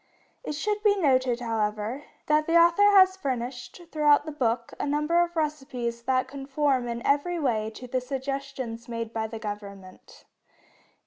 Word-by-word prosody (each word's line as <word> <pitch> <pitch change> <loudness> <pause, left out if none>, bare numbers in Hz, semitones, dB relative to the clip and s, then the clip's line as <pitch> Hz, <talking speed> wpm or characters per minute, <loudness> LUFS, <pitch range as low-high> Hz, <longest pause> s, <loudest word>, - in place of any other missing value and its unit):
It - - -4
should 415 +7 -2
be 415 -1 +3
noted, 255 -7 +2
however, 220 +3 -2 0.2
that 305 0 +2
the 335 +1 +4
author 345 +5 +6
has 375 -2 +6
furnished, 255 0 -5
throughout 295 -1 +4
the 310 - -5
book, 235 -5 -1
a - - -2
number 300 +4 +2
of 345 0 -1
recipes 270 -7 -3
that 255 +1 0
conform 270 -1 -1
in 235 0 -5
every 290 +5 +1
way 225 -8 0
to 250 - -9
the 255 +1 -2
suggestions 265 -3 -5
made 230 -1 -4
by 220 -1 -2
the 225 +1 -7
Government. 200 -3 -9
265 Hz, 155 wpm, -26 LUFS, 235-300 Hz, 0.2 s, author